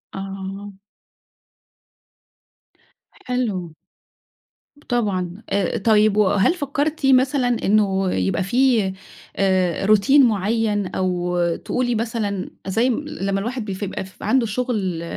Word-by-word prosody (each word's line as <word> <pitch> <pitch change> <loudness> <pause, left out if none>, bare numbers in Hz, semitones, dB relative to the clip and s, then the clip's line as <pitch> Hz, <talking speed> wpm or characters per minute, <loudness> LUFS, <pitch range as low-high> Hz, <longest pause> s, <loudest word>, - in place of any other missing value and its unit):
آه. 195 +1 -7 2.3
حلو. 210 - -3 1.0
ب 290 - -21
طبعًا، 200 -4 -1
آآ، 200 -3 0
طيب 215 0 +3
وهل 205 - +3
فكّرتِ 290 -1 -2
مثلًا 260 0 +3 0.2
إنه 195 -2 +2
يبقى 95 - 0
فيه 230 -3 +2 0.4
آآ 185 -2 +1
روتين 240 +7 +5
مُعيّن، 210 -1 0
أو 180 -1 -1 0.2
تقولي 245 -2 -2
مثلًا 215 -4 -2 0.2
زي 225 +7 +1
م 275 +5 -2
لمّا 195 -8 -2
الواحد 235 +2 -4
بي 195 - -4
ف 190 - -6
بقى 190 -1 -4
ف 190 - -15
عنده 260 -3 +2
شغل، 210 -7 -2
205 Hz, 110 wpm, -21 LUFS, 190-245 Hz, 2.3 s, روتين